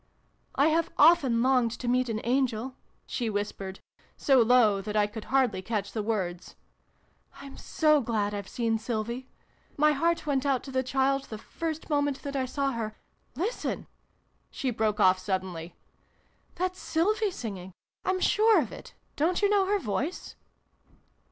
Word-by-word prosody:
" - - -30
I - - +5
have 325 +1 +1
often 275 -7 +5
longed 255 -2 +3
to 245 - -6
meet 250 0 +2
an 220 -1 -2
angel," 255 0 0 0.3
she 235 -3 -2
whispered, 200 -2 -4 0.4
so 270 -3 +4
low 225 -4 +4
that 210 +2 -5
I 210 -1 +4
could 210 +1 -7
hardly 255 -8 +1
catch 200 0 -3
the 220 - -2
words. 190 -5 -3 0.4
" - - -35
I'm 275 -1 -10
so 305 -2 +2
glad 215 -4 -1
I've 200 -1 -5
seen 225 -2 0
Sylvie! 235 +3 -3 0.5
My 300 +1 +5
heart 335 +4 0
went 275 -3 0
out 275 -3 +1
to 270 - -8
the 260 0 +1
child 270 +1 0
the 215 - -7
first 320 +8 -5
moment 285 -2 0
that 280 -1 -5
I 265 -1 0
saw 275 +1 -1
her 220 -3 -4 0.4
Listen! 390 - -3 0.3
" - - -43
she 260 - -2
broke 215 -2 0
off 185 -2 +5
suddenly. 185 -3 -4 0.4
" - - -38
That's 370 +1 -2
Sylvie 415 +6 +1
singing! 195 - -7 0.3
I'm 375 0 0
sure 435 +3 +4
of - - -2
it! - - -11 0.2
Don't 340 +6 +1
you 405 - +4
know 395 -2 +3
her 410 +1 +2
voice 285 - -3
255 Hz, 170 wpm, -28 LUFS, 215-295 Hz, 0.5 s, I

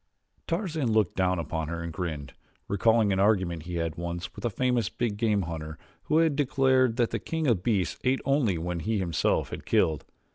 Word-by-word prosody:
Tarzan 165 - -1
looked 110 -4 +2
down 90 -1 +1
upon 80 -1 -3
her 85 +1 -4
and 85 -1 -5
grinned, 80 -5 -4 0.3
recalling 110 +1 +3
an 95 - 0
argument 95 -5 +1
he 90 - -4
had 85 -1 -2
once 85 +1 -4
had - - -10
with - - -9
a - - +2
famous 125 +2 0
big 115 -4 -2
game 105 -2 +1
hunter 80 -2 -6 0.3
who 155 - +2
had 160 -3 +3
declared 130 -4 +3
that 120 -2 +2
the - - -1
king 160 -1 -3
of 115 -10 +2
beasts 100 -3 0
ate 130 +1 +2
only 135 - +2
what 85 +1 -3
he 110 +5 0
himself 85 -5 0
had - - -6
killed. 80 -3 +1
100 Hz, 205 wpm, -27 LUFS, 85-125 Hz, 0.3 s, recalling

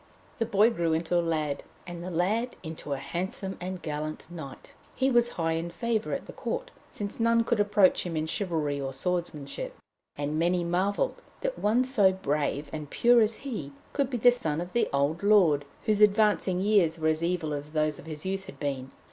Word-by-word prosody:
The 225 - +1
boy 210 +4 +4
grew 170 -6 0
into 165 +2 0
a 175 - +4
lad, 155 -4 -1 0.2
and 175 -1 -7
the 180 - -4
lad 205 +8 0
into 160 -3 -5
a - - -2
handsome 190 +6 -4
and 185 0 -5
gallant 155 +2 -4
knight. 155 -6 -9 0.2
He 265 0 +2
was 240 -1 +3
high 165 -1 +1
in 165 +1 -2
favour 225 +4 -1
at - - -3
court, - - -4 0.2
since 205 +1 -5
none 230 0 +4
could 230 -1 0
approach 205 -2 +4
him 170 -3 -3
in 155 - 0
chivalry 160 -5 -1
or 135 0 -3
swordmanship, 155 -2 -3 0.4
and 145 +2 -2
many 175 +1 +2
marvelled 195 - 0 0.2
that - - -2
one 225 +5 +3
so 220 -7 +4
brave 150 -4 -1
and 150 -2 -5
pure 240 +6 +5
as 215 0 +2
he 160 - -4 0.2
could 280 -3 +1
be 250 - -2
the 245 +2 +6
son 160 -11 -2
of 175 +1 -5
the 240 - +2
old 140 +4 +1
lord, 180 -9 +4 0.2
whose 215 -1 +2
advancing 205 -3 +4
years 190 -6 +3
were 160 -1 +1
as 155 0 0
evil 170 -3 0
as 145 0 -5
those 155 -1 0
of - - -12
his 155 0 -6
youth 190 0 -2
had 190 - -11
been. 135 -3 -3
175 Hz, 200 wpm, -28 LUFS, 155-210 Hz, 0.4 s, the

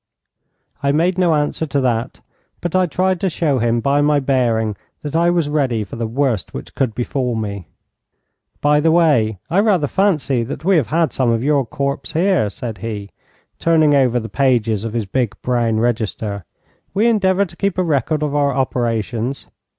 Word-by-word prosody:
I 140 -1 +2
made 175 +5 +1
no 175 -3 +3
answer 150 +2 -1
to 140 0 0
that, 120 -1 -1 0.4
but 175 0 -3
I 185 -1 +3
tried 185 +2 0
to 190 - +1
show 155 -5 0
him 115 0 +1
by 140 +3 +2
my 145 0 +3
bearing 120 -6 0 0.3
that 150 0 -5
I 170 +1 +3
was 170 -3 +1
ready 135 -7 0
for 100 - -9
the 115 -1 -3
worst 120 -4 -1
which - - -8
could 125 -5 -1
befall 125 0 -2
me. 100 -5 -4 0.9
'By 150 0 +4
the 160 +2 +2
way, 145 - +3
I 175 +4 +1
rather 200 -7 +3
fancy 150 -7 +1
that 135 +6 -6
we 195 0 +4
have 155 - +1
had 165 0 +1
some 130 -3 +1
of 115 0 +1
your 140 -3 +1
corps 140 +3 -2
here,' 170 - +2
said 110 0 -7
he, 105 -2 -5 0.5
turning 160 -3 +3
over 130 -3 +3
the 115 - -6
pages 115 -6 +1
of 115 -1 -4
his 115 -3 -1
big 120 +2 -2
brown 120 -3 +1
register. 110 -4 -2 0.5
'We 210 +3 +2
endeavour 200 -4 +3
to 175 - -13
keep 200 -2 -1
a 185 - +2
record 150 -1 0
of 145 -1 -1
our 145 -1 +2
operations. 120 -1 -2
140 Hz, 185 wpm, -19 LUFS, 115-160 Hz, 0.9 s, By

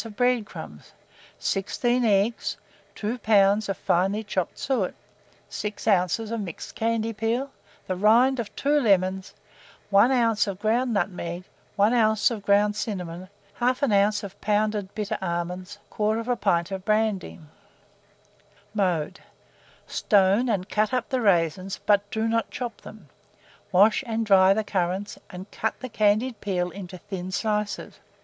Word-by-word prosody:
of 225 -3 -10
bread 245 -1 +2
crumbs, - - -10 0.4
16 240 +5 0
eggs, 210 +1 +1 0.4
2 225 +4 -3
lbs. 205 -1 +3
of 195 - -2
finely 195 +5 +1
chopped 190 -4 -3
suet, 245 -9 -1 0.5
6 210 +1 -5
oz. 185 -2 +3
of 225 0 -4
mixed 175 -5 -7
candied 225 -1 -1
peel, 235 +5 -1 0.3
the 185 - -2
rind 235 +7 +4
of 215 -3 -5
2 295 +1 +2
lemons, 190 -5 +1 0.6
1 200 +6 +5
oz. 230 -5 +2
of 195 -2 -4
ground 230 +5 +1
nutmeg, 175 -2 -2 0.3
1 205 +4 +3
oz. 220 -2 +3
of 220 -3 -4
ground 205 +1 +3
cinnamon, 185 -4 -5 0.3
1/2 240 -5 +3
oz. 210 0 -3
of 200 0 -9
pounded 210 -1 0
bitter 210 -2 -3
almonds, 180 +2 -4
1/4 225 +3 0
pint 175 -2 +1
of 190 -1 -4
brandy. 215 -3 0 1.3
Mode. 180 -7 -1 0.7
Stone 205 +4 +2
and 195 -4 -1
cut 215 +1 0
up 250 -2 -2
the 260 -2 0
raisins, 185 -1 +1
but 205 -1 +3
do 220 +1 -1
not 230 0 0
chop 240 -3 -6
them; 210 -8 -13 0.6
wash 205 +7 +4
and 225 0 -1
dry 190 -2 +6
the 215 +2 +2
currants, 190 +1 -2
and 185 +3 -10
cut 220 - -3
the 255 - -6
candied 215 +3 +1
peel 180 -3 -1
into 185 -2 -8
thin 185 -1 -6
slices. 210 0 -2
205 Hz, 140 wpm, -25 LUFS, 190-225 Hz, 1.3 s, dry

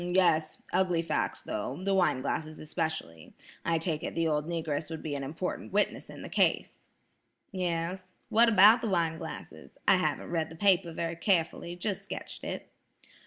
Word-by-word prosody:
"H'm, 175 +1 -3
yes. 160 -4 +3 0.2
Ugly 180 -3 +2
facts, 165 - -1
though, 135 +5 -4
the 195 0 +1
wine 180 -8 +3
glasses 155 0 -2
especially. 155 - -4 0.3
I 165 -1 +2
take 160 -2 -1
it - - -4
the 165 -1 +1
old 150 0 0
Negress 160 -3 -2
would 160 -1 -6
be 155 - -3
an 140 -1 -3
important 160 +7 -4
witness 205 +2 0
in - - -9
the - - -6
case." - - 0 0.6
"Yes. 180 0 -2 0.2
What 230 +1 +6
about 215 +2 +7
the 225 - -1
wine 165 -3 +1
glasses? - - -9
I - - +7
haven't - - -1
read 160 -2 0
the 165 - -10
paper 185 -1 +3
very 165 +1 -3
carefully; 170 -1 0
just 190 +3 -2
sketched - - -7
it." - - -5
170 Hz, 175 wpm, -30 LUFS, 160-185 Hz, 0.6 s, about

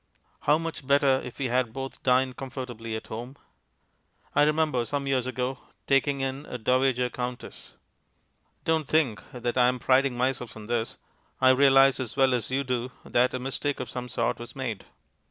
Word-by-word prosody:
How 150 +1 +3
much 165 -4 -6
better 140 -1 +4
if 125 - -8
we 140 - -2
had 125 -2 +1
both 135 +1 -6
dined 130 0 +2
comfortably 120 -4 -6
at 110 - -6
home. 120 +5 -7 1.0
I - - +4
remember 150 -5 +1
some 140 +4 -3
years 130 -2 0
ago 130 +1 -2 0.3
taking 135 0 +2
in 135 +2 -3
a 125 - -5
Dowager 125 +1 +2
Countess. 125 0 -6 0.9
Don't 160 -3 +1
think 135 -12 +2
that 120 0 -2
I 125 - +6
am 125 0 +1
priding 130 +1 +2
myself 125 -3 -1
on 110 - -9
this; 115 0 -2 0.4
I 130 0 +6
realize 135 0 +5
as 130 0 -5
well 135 -1 +4
as 120 -2 -1
you 135 +2 0
do 125 -1 -2
that 125 +1 +2
a - - -2
mistake 135 +2 -2
of - - -5
some 125 0 -5
sort 120 -1 -1
was 120 0 -9
made. 125 -7 -4
130 Hz, 175 wpm, -27 LUFS, 125-135 Hz, 1.0 s, I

